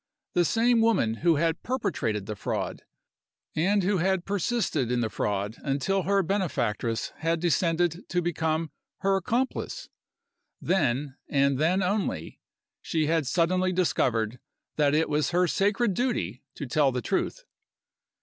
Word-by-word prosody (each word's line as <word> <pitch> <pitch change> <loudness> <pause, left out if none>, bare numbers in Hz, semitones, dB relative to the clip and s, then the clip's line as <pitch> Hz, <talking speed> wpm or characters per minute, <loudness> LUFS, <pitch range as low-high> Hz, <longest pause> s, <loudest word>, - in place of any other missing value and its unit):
The 175 - +3
same 230 +4 +3
woman 165 - +2
who 170 +3 +3
had 165 +2 0
perpetrated 145 - -2
the 105 - -5
fraud, - - -3 0.7
and 195 +5 +2
who 195 +2 +2
had 185 +1 +1
persisted 195 - 0
in 125 -1 +1
the 110 -2 -1
fraud 100 +2 -2
until 140 +8 0
her 195 +2 +2
benefactress 130 - -1
had 165 +1 0
descended 170 0 +1
to 180 - +1
become 160 -2 -1 0.3
her 195 0 +3
accomplice. 240 +7 -2 0.7
Then, 145 -6 0
and 140 -1 +2
then 180 +5 +2
only, 180 - -2 0.4
she 160 -2 0
had 160 -2 +1
suddenly 180 +5 +2
discovered 125 -10 0 0.4
that 145 -1 +3
it 160 +1 +2
was 150 0 +1
her 180 +1 +3
sacred 200 +5 +1
duty 130 - -1
to 145 - -5
tell 140 +2 +2
the 125 -1 -3
truth! - - -1
165 Hz, 140 wpm, -27 LUFS, 135-190 Hz, 0.7 s, The